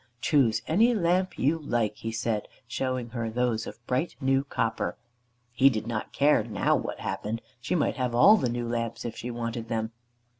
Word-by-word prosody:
"Choose 120 -5 +2
any 225 +9 +4
lamp 185 -1 +1
you 155 +5 +2
like," 115 -8 -1
he 115 - -4
said, 115 -2 -2 0.2
showing 130 0 -2
her 115 -1 -3
those 115 -1 0
of 120 - -10
bright 130 +8 -1
new 135 -1 +2
copper. 115 -5 -2 0.5
He 130 +3 +5
did 110 -4 -3
not 115 -2 -3
care 145 -4 +3
now 105 -3 +1
what - - -4
happened. 110 +2 -3 0.2
She 120 +9 -2
might 155 - +1
have 125 -2 -1
all 200 - +8
the 125 - 0
new 120 0 -2
lamps 115 0 -3
if 115 -1 -4
she 120 - -5
wanted 115 -1 -4
them. 110 -1 -2
120 Hz, 185 wpm, -27 LUFS, 115-135 Hz, 0.5 s, all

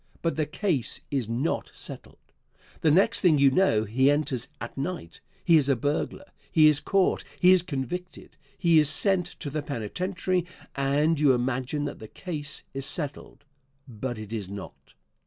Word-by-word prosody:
But 165 - 0
the 155 -2 -1
case 150 - -1
is 130 -6 -1
not 125 +8 -1
settled. - - -9 0.6
The 160 - +3
next 195 +9 +5
thing 170 -6 +5
you 140 -1 +5
know 130 - +3
he 130 +6 +2
enters 145 -4 0
at - - -7
night. 135 - -5 0.2
He 165 - +6
is 140 -2 +1
a 135 - +4
burglar. 145 - -2 0.3
He 155 -3 +5
is 150 -2 +6
caught; 195 +3 +1 0.2
he 180 - +6
is 185 -1 +6
convicted; 180 +2 -6 0.2
he 170 -3 +5
is 150 -2 +3
sent 190 -2 +2
to 145 - -4
the 155 +1 -2
penitentiary, 180 - -2 0.3
and 145 +3 +2
you 140 -4 +5
imagine 130 +4 -1
that 145 - -5
the 110 - -9
case 150 - -6
is 135 0 -4
settled. 145 -2 -6 0.4
But 120 0 -5
it 110 0 -8
is 105 -4 -4
not. 100 -1 -10
145 Hz, 170 wpm, -27 LUFS, 130-170 Hz, 0.6 s, He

